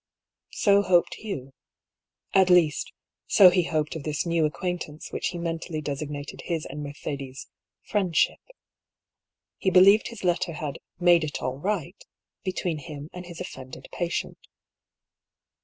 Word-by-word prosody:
So 200 -2 +5
hoped 180 -3 +3
Hugh. 135 -11 -6 0.8
At 190 -1 +5
least, 170 -5 +4 0.4
so 185 -3 +8
he 180 0 +3
hoped 155 -1 -1
of 160 - -4
this 150 +2 -2
new 165 -2 +2
acquaintance 155 0 -5
which - - -2
he 175 - -4
mentally 165 -1 -3
designated 145 -1 -5
his 165 -3 -2
and 145 +3 -6
Mercedes' 140 -2 -6 0.4
"friendship." 190 -5 +1 1.2
He 190 - +2
believed 190 +4 +6
his 230 -4 -9
letter 175 -1 +1
had 155 -3 -5 0.2
"made 175 -2 +5
it 150 -1 -3
all 130 +1 -2
right" 185 0 -3 0.4
between 180 -4 -2
him 150 0 -9
and 180 0 -8
his 170 -2 -9
offended 130 -7 -8
patient. 175 -1 -3
170 Hz, 135 wpm, -26 LUFS, 150-180 Hz, 1.2 s, so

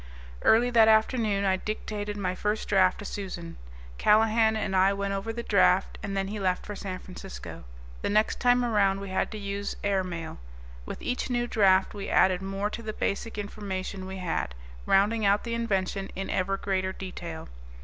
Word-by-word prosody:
Early 240 +3 +4
that 225 -2 +6
afternoon 220 -2 +3
I 190 -1 +3
dictated 210 0 -4
my 185 -2 -1
first 210 +3 -2
draft 185 -2 +4
to 205 - -8
Susan. 180 -5 -6 0.4
Callahan 220 +1 +4
and 205 -3 -1
I 190 +1 +4
went 200 0 -2
over 195 +3 -3
the 235 +1 -5
draft, - - +3
and 195 0 -4
then 195 0 -1
he 210 +1 -4
left 185 -2 0
for 205 - -6
San 190 -2 -5
Francisco. - - -9 0.4
The - - -1
next 215 +1 +2
time 245 0 +4
around 200 -4 +2
we 200 0 -6
had 185 - 0
to 215 - -6
use 200 0 -4
air 200 -2 +1
mail. 170 -3 -6 0.5
With - - -7
each 250 +1 -2
new 240 -1 0
draft 195 -5 +3
we 200 -2 -5
added 185 -1 +4
more 195 +2 -2
to 230 - -5
the 215 -1 -5
basic 215 +2 -2
information 195 -2 -5
we 190 0 -6
had, 165 - -2 0.3
rounding 210 +3 +3
out 200 +1 +3
the 235 - -3
invention 195 -4 -1
in 195 0 -4
ever 195 +1 0
greater 190 -1 -1
detail. 175 -4 -7
200 Hz, 185 wpm, -27 LUFS, 190-215 Hz, 0.5 s, that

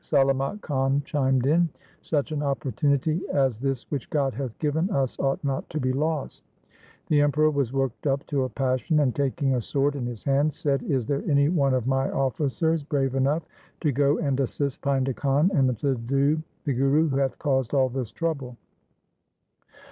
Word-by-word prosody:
Salamat 135 +5 +1
Khan 135 -1 0
chimed 135 -3 +1
in. 165 +4 +3 0.2
' - - -31
Such 150 -1 +1
an 150 -1 -2
opportunity 140 - 0
as 135 -6 +1
this 135 -1 -2
which 140 -4 -3
God 140 -3 0
hath 125 -1 -5
given 160 +4 0
us 135 - 0
ought 135 +2 0
not 135 -2 -2
to 155 - -3
be 130 -2 0
lost.' 150 +1 -2 0.7
The 150 -2 +4
Emperor 150 +1 +3
was 140 -5 -1
worked 135 0 -2
up 135 0 0
to 140 -3 0
a - - -4
passion 130 +6 0
and 135 -5 +2
taking 140 0 0
a 125 - 0
sword 140 +4 0
in 125 -4 -3
his 120 -4 -7
hand 140 +2 +2
said, 140 -3 0
' - - -7
Is 130 -5 +1
there 140 +3 -1
any 140 0 +4
one 140 -6 +2
of 125 -3 -1
my 135 +1 +1
officers 145 +5 0
brave 140 -3 -1
enough 140 +5 +1 0.4
to 150 - +2
go 140 +3 +2
and 140 -4 -1
assist 140 +1 -2
Painda 135 -2 0
Khan, 145 +6 +2
and 130 - +2
subdue 135 +4 +1 0.2
the 140 - +1
Guru 135 +5 +3
who 135 - 0
hath 135 -1 0
caused 135 -3 0
all 135 -1 +4
this 125 -3 -4
trouble.' 140 -8 -3
140 Hz, 185 wpm, -25 LUFS, 130-145 Hz, 0.7 s, The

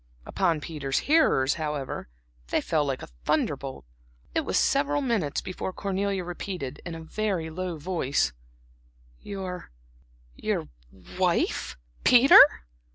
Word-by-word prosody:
Upon 170 -6 0
Peter's 145 -4 -3
hearers, 275 - +4
however, 150 - -4 0.4
they - - +1
fell 155 -2 0
like 135 -2 -3
a - - -8 0.2
thunderbolt. - - -1 0.5
It - - +2
was - - 0
several 145 0 +2
minutes 215 - 0
before 185 0 -5
Cornelia 195 0 -2
repeated, 175 -5 -6
in 170 -2 -6
a 165 - -8
very 180 -2 -2
low 180 0 -4
voice: 145 - 0 0.9
"Your 185 -3 -6 0.6
your - - -2 0.5
wife, 175 - 0 0.3
Peter?" 250 +2 +9
170 Hz, 115 wpm, -27 LUFS, 145-190 Hz, 0.9 s, Peter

